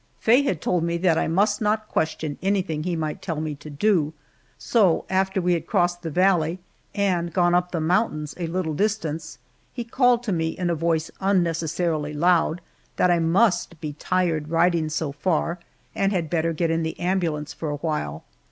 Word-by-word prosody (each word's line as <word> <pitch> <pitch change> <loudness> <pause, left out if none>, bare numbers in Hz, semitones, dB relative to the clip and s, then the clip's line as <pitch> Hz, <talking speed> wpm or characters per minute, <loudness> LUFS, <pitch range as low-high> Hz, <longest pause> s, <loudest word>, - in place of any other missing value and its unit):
Faye 240 +5 +4
had 190 - -1
told 175 -2 0
me 170 0 0
that 170 -2 +2
I - - 0
must 205 +6 +1
not 215 0 0
question 155 -4 -2
anything 190 -5 0
he 180 -1 -1
might 155 -2 -3
tell 165 -5 -3
me 155 -1 -3
to 145 +2 -11
do, 155 0 +1 0.4
so 200 -8 +2
after 190 0 +1
we 180 -1 +2
had 170 - -2
crossed 175 -3 +1
the 165 - -4
valley 175 0 +2 0.4
and 180 -4 0
gone 175 +1 +2
up 180 0 +1
the 170 - -1
mountains 155 -2 0
a 170 - -2
little 165 -2 -2
distance 165 -5 -2 0.3
he 240 - -5
called 245 0 +2
to 225 - -2
me 165 -3 0
in 180 -2 0
a - - +2
voice 165 0 0
unnecessarily 165 -4 0
loud, 170 +1 +2 0.3
that 180 - +3
I 175 - +3
must 170 0 +2
be 150 -2 -5
tired 160 -1 -1
riding 165 -1 +2
so 155 -1 -2
far, 170 +3 -1 0.3
and 195 0 +1
had 170 -5 -2
better 165 -1 +1
get 165 0 0
in 165 0 +1
the 160 0 -4
ambulance 170 -5 -1
for 160 - -5
a 145 - -2
while. 140 - -3
170 Hz, 190 wpm, -24 LUFS, 160-185 Hz, 0.4 s, Faye